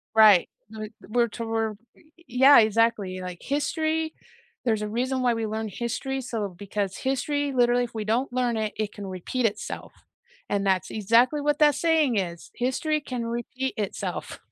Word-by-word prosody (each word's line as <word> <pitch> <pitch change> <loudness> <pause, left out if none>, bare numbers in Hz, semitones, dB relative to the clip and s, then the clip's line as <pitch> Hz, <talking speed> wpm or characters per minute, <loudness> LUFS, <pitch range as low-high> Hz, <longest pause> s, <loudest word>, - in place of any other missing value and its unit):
Right, 210 -5 +7 0.2
we 215 0 -7 0.2
we're 235 +2 +2
tor 225 -1 -2 0.2
y - - -23 0.2
yeah, 265 +3 +7
exactly, 215 -4 +2
like 180 -1 -6
history, 315 +3 -1 0.5
there's 220 -3 +1
a 210 - -2
reason 255 +3 -1
why 245 -1 +3
we 225 -1 -2
learn 220 0 -3
history, 250 +5 -3
so 225 -5 -3
because 200 -1 -3
history 280 +2 -1
literally 245 0 +3
if 235 - -12
we 220 -1 -3
don't 240 +5 0
learn 245 -3 +1
it, 215 -1 -2
it 215 -1 -2
can 200 -2 -7
repeat 190 +7 -2
itself, 210 -1 -3 0.6
and 200 -1 0
that's 190 -1 +1
exactly 230 +7 +3
what 295 0 +1
that 295 -2 +5
saying 310 -7 +2
is, 170 -3 -3
"History 300 +5 0
can 250 -4 -4
repeat 240 +3 -3
itself." 205 -2 -4
235 Hz, 165 wpm, -26 LUFS, 210-265 Hz, 0.6 s, Right